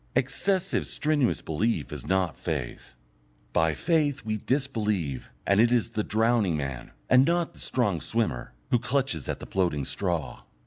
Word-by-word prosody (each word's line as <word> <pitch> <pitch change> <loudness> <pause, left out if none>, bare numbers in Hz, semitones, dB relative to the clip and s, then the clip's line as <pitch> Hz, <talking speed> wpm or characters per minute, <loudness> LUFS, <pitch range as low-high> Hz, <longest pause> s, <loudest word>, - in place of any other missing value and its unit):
Excessive 185 +9 +1
strenuous 150 -5 +1
belief 80 +1 -1
is - - -7
not 95 -3 +1
faith. 70 -8 -5 0.6
By 80 -1 +2
faith 150 - +1
we 110 -1 -1
disbelieve, 105 - -1 0.2
and 100 +1 +3
it 120 +1 +4
is 120 -2 +2
the 110 -2 -1
drowning 110 -6 +2
man, 70 -4 -4 0.2
and 130 0 +6
not 170 +2 +1
the - - -16
strong 100 - 0
swimmer, 110 - -1 0.2
who 120 - +4
clutches 125 - -1
at - - -2
the - - -8
floating 85 -7 0
straw. 85 -8 -2
110 Hz, 150 wpm, -27 LUFS, 80-130 Hz, 0.6 s, and